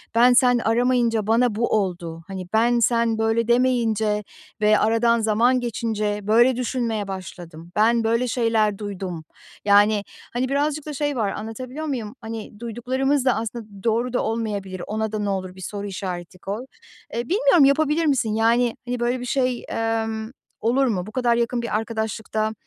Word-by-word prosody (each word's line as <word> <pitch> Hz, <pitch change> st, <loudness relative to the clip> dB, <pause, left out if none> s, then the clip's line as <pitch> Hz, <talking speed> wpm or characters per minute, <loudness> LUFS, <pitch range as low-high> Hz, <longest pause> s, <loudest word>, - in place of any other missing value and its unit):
"Ben, 245 Hz, +2 st, +6 dB
sen 245 Hz, 0 st, +5 dB
aramayınca 235 Hz, -2 st, +1 dB
bana 230 Hz, 0 st, +3 dB
bu 235 Hz, +2 st, +1 dB
oldu." 175 Hz, -4 st, -3 dB
Hani, 190 Hz, -2 st, -6 dB
"Ben, 235 Hz, +2 st, +3 dB
sen 230 Hz, -1 st, +2 dB
böyle 225 Hz, +1 st, +1 dB
demeyince 230 Hz, -4 st, +2 dB, 0.4 s
ve 210 Hz, 0 st, +4 dB
aradan 230 Hz, +1 st, +3 dB
zaman 230 Hz, +4 st, +3 dB
geçince 215 Hz, -3 st, -2 dB
böyle 235 Hz, +5 st, +4 dB
düşünmeye 235 Hz, -4 st, -2 dB
başladım. 175 Hz, -3 st, -8 dB
Ben 230 Hz, +2 st, +3 dB
böyle 230 Hz, +3 st, +1 dB
şeyler 225 Hz, -4 st, +1 dB
duydum." 190 Hz, -5 st, -6 dB, 0.4 s
Yani, 205 Hz, 0 st, +5 dB, 0.3 s
hani, 250 Hz, +2 st, -1 dB
birazcık 290 Hz, +2 st, 0 dB
da 305 Hz, -, -5 dB
şey 290 Hz, 0 st, -1 dB
var 215 Hz, -5 st, 0 dB
anlatabiliyor 255 Hz, +7 st, -6 dB
muyum? 245 Hz, -6 st, -4 dB
Hani, 220 Hz, -2 st, -7 dB
duyduklarımız 255 Hz, +4 st, -1 dB
da 255 Hz, -, +3 dB
aslında 225 Hz, +1 st, -4 dB, 0.2 s
doğru 235 Hz, +2 st, 0 dB
da 250 Hz, -, +1 dB
olmayabilir. 205 Hz, -5 st, -3 dB
Ona 220 Hz, 0 st, -2 dB
da 215 Hz, -, -2 dB
ne 205 Hz, -1 st, -1 dB
olur 185 Hz, -2 st, -3 dB
bir 190 Hz, -, -12 dB
soru 205 Hz, +1 st, -5 dB
işareti 185 Hz, -2 st, -6 dB
koy. 205 Hz, +7 st, -5 dB, 0.5 s
Eee, 235 Hz, -, -1 dB
bilmiyorum 385 Hz, -, +5 dB
yapabilir 305 Hz, +3 st, +2 dB
misin? 255 Hz, -7 st, +1 dB
Yani, 230 Hz, +2 st, +2 dB
hani, 245 Hz, 0 st, -3 dB
böyle 245 Hz, +2 st, 0 dB
bir 245 Hz, -, -5 dB
şey, 255 Hz, -1 st, 0 dB
emm, 225 Hz, 0 st, -2 dB, 0.3 s
olur 250 Hz, +4 st, +2 dB
mu? 185 Hz, -6 st, -1 dB
Bu 215 Hz, -, -9 dB
kadar 240 Hz, -1 st, +2 dB
yakın 235 Hz, +1 st, 0 dB
bir 235 Hz, -, -3 dB
arkadaşlıkta 220 Hz, -1 st, -2 dB
225 Hz, 165 wpm, -23 LUFS, 210-245 Hz, 0.5 s, Ben